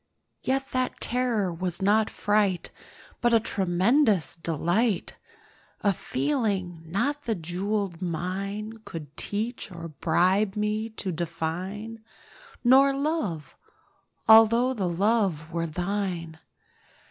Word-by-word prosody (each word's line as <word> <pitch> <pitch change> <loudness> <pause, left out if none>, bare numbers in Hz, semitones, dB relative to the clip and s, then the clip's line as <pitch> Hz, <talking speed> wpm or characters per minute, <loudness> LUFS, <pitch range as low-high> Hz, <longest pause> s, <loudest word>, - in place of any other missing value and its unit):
Yet 270 +1 -1
that 255 0 -1
terror 235 -7 0
was 175 0 -3
not 210 +3 +3
fright, 205 -3 +1 0.5
But 240 -1 +4
a - - +6
tremulous 195 - +2
delight— 170 +6 0 0.7
A 200 -2 +3
feeling 200 - -1
not 285 - -1
the 225 - 0
jewelled 185 +1 -3
mine 195 +5 -3
Could 160 -7 -8
teach 220 +1 -3
or 170 -1 -7
bribe 185 +7 +2
me 210 +1 -1
to 210 -4 -4
define— 180 +7 -4 0.6
Nor 270 +2 +6
Love—although 230 - +1
the 195 -7 -1
Love 185 -4 +1
were 165 -1 -1
thine. 175 -1 -3
200 Hz, 100 wpm, -26 LUFS, 175-225 Hz, 0.7 s, a